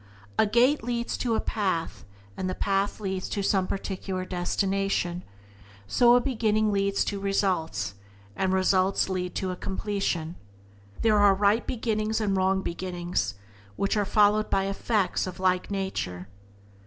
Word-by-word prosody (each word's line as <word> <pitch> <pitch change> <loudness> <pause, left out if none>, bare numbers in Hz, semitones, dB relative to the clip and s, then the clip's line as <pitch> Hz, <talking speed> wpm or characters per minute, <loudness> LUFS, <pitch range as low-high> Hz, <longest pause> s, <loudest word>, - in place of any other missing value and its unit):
A - - +5
gate 245 +7 +3
leads 235 0 -2
to 235 -3 0
a - - +1
path, 185 -7 -2 0.3
and 185 - -3
the 185 - -3
path 195 +1 0
leads 190 -2 -3
to 200 - -2
some 190 -1 +2
particular 190 -1 -4
destination; 185 0 -1 0.6
so 240 - +5
a - - +6
beginning 215 -4 +1
leads 200 0 +1
to 200 - -3
results, 180 - 0 0.4
and 190 +7 0
results 190 +1 +2
lead 180 -1 -3
to 190 -1 -1
a - - -4
completion. 190 -4 -2 0.7
There 215 -2 +4
are 200 -1 +6
right 205 +3 +2
beginnings 220 -2 -1
and 205 -3 0
wrong 190 0 +1
beginnings, 175 - -3 0.4
which 200 - 0
are 210 - +2
followed 210 +1 +3
by 195 - +2
effects 195 0 0
of 180 - -6
a 185 - -8
like 185 -1 +2
nature. 190 - -3
195 Hz, 150 wpm, -27 LUFS, 185-210 Hz, 0.7 s, a